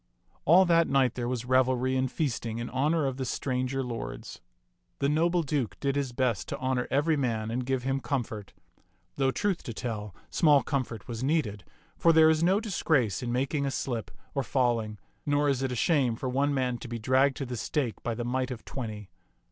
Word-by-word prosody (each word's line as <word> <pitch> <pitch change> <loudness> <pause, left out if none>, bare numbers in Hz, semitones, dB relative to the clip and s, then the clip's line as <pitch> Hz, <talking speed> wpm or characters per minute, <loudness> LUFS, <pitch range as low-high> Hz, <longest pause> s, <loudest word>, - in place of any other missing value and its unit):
All 180 +5 +7
that 170 -1 +4
night 135 -2 +3
there 120 -1 -3
was 125 -1 -2
revelry 130 0 +2
and 130 -1 0
feasting 115 -7 -2
in 120 0 -4
honor 150 +4 +1
of 135 -1 -2
the 135 - -2
stranger 130 +1 -1
lords. 120 -2 -6 0.6
The 140 - +1
noble 170 +4 +2
Duke 140 -6 -2
did 140 -1 0
his 140 -3 -1
best 120 -8 0
to - - -4
honor 130 -1 -1
every 145 +4 +2
man 115 -6 -1
and 125 +2 -1
give 130 -2 0
him 135 +1 0
comfort; 115 -7 -3 0.7
though, 135 -1 +2
truth 185 +8 0
to 115 - -7
tell, 105 -6 -5 0.2
small 150 -4 +5
comfort 125 -7 -3
was 120 0 -5
needed, 130 - 0 0.4
for 170 - +5
there 160 -1 +7
is 155 0 +1
no 185 +4 +4
disgrace 160 - +1
in 120 -1 -3
making 135 +4 0
a - - +1
slip 120 -6 -3 0.2
or 140 - 0
fall 125 -2 +1
ing, 105 -1 -6 0.3
nor 145 0 +2
is 135 -2 +1
it 135 -1 -1
a - - -2
shame 130 -3 +2
for 130 - -4
one 140 +3 +1
man 125 -3 0
to - - -8
be 120 0 -4
dragged 130 +4 +2
to 140 - -3
the 125 -1 -5
stake 120 +1 -2
by 120 - -2
the 120 +1 -4
might 130 +1 -1
of 125 -3 -7
twenty. 105 -7 -6
130 Hz, 205 wpm, -28 LUFS, 120-140 Hz, 0.7 s, All